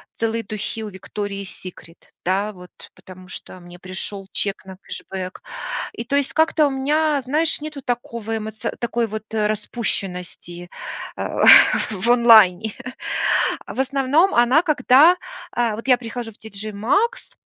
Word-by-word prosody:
целые 225 Hz, 0 st, -1 dB
духи 215 Hz, +1 st, -5 dB
у 215 Hz, -, -5 dB
Victoria's 200 Hz, +1 st, -5 dB, 0.2 s
Secret, 170 Hz, -2 st, -11 dB, 0.3 s
да, 195 Hz, +4 st, 0 dB
вот 180 Hz, -1 st, -14 dB, 0.2 s
потому 185 Hz, 0 st, -14 dB
что 185 Hz, 0 st, -8 dB
мне 175 Hz, 0 st, -13 dB
пришел 190 Hz, +2 st, -6 dB
чек 195 Hz, -1 st, -2 dB
на 190 Hz, -1 st, -10 dB
кэшбэк. 185 Hz, -1 st, -7 dB, 0.6 s
И -, -, -2 dB
то 275 Hz, -, -1 dB
есть 285 Hz, -1 st, 0 dB
как-то 315 Hz, -1 st, +3 dB
у -, -, -2 dB
меня, 295 Hz, +2 st, +1 dB
знаешь, 300 Hz, +5 st, +1 dB
нету 300 Hz, -2 st, -7 dB
такого 235 Hz, -2 st, -3 dB
эмоци 220 Hz, 0 st, -5 dB
такой 235 Hz, 0 st, 0 dB
вот 215 Hz, -1 st, -6 dB
распущенности, 195 Hz, -5 st, -3 dB, 0.5 s
а, -, -, -1 dB, 0.5 s
в 215 Hz, +3 st, -2 dB
онлайне. 220 Hz, -4 st, +6 dB, 0.9 s
А -, -, -8 dB
в -, -, -5 dB
основном 280 Hz, +7 st, +2 dB
она, 240 Hz, +6 st, +5 dB
когда, 305 Hz, +1 st, +5 dB, 0.4 s
а, 235 Hz, -3 st, 0 dB
вот 230 Hz, +4 st, -9 dB
я 250 Hz, -2 st, +5 dB
прихожу 235 Hz, -1 st, -6 dB
в 210 Hz, -, -22 dB
TJ 215 Hz, 0 st, -7 dB
Maxx, 400 Hz, -, 0 dB
225 Hz, 145 wpm, -21 LUFS, 195-265 Hz, 0.9 s, онлайне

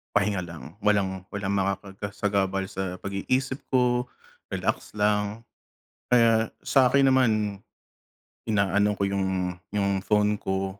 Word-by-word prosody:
pahinga 100 Hz, -1 st, +2 dB
lang, 85 Hz, +2 st, -10 dB
walang, 95 Hz, -3 st, +1 dB
walang 100 Hz, -1 st, -2 dB
makakasagabal 100 Hz, 0 st, -1 dB
sa 95 Hz, -2 st, -3 dB
pag-iisip 130 Hz, +8 st, -1 dB
ko, 125 Hz, -1 st, +2 dB, 0.5 s
relax -, -, -2 dB
lang. 105 Hz, +1 st, +1 dB, 0.7 s
Kaya 115 Hz, -2 st, +4 dB
sakin 135 Hz, 0 st, +4 dB
naman, 130 Hz, -3 st, +4 dB, 1.2 s
inaano 100 Hz, 0 st, +2 dB
ko 100 Hz, -, +1 dB
yung 95 Hz, -2 st, -1 dB, 0.2 s
yung 100 Hz, -1 st, 0 dB
phone 105 Hz, +1 st, +2 dB
ko. 95 Hz, 0 st, -1 dB
100 Hz, 105 wpm, -26 LUFS, 95-110 Hz, 1.2 s, Kaya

